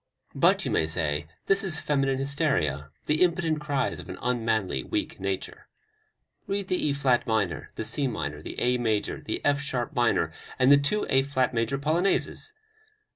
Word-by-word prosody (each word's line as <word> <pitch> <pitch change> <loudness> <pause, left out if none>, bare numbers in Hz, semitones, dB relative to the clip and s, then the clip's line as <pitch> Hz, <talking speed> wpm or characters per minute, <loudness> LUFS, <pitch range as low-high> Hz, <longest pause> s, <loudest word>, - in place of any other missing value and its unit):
But, - - +3
you - - -1
may 80 - +2
say, 75 -2 -1 0.2
this 195 +1 +3
is 170 -6 -1
feminine 135 -2 +1
hysteria, 135 - 0 0.2
the 150 +1 +1
impotent 170 -3 +2
cries 145 -2 -1
of - - -10
an - - -6
unmanly, 110 - 0
weak - - -3
nature. 95 0 -4 0.8
Read 200 -1 -2
the 180 - +1
E - - +2
flat 135 -3 +2
minor, 100 - 0
the - - -4
C 140 -2 0
minor, 75 - -4
the - - -6
A 125 0 +2
major, 110 -3 0
the - - -4
F 145 -1 +3
sharp 130 0 -2
minor 120 -3 +2 0.3
and 130 +2 +5
the 145 - +9
two 140 +10 0
A 135 - +4
flat 130 -2 0
major 115 +3 0
Polonaises! 170 - 0
135 Hz, 175 wpm, -27 LUFS, 110-150 Hz, 0.8 s, the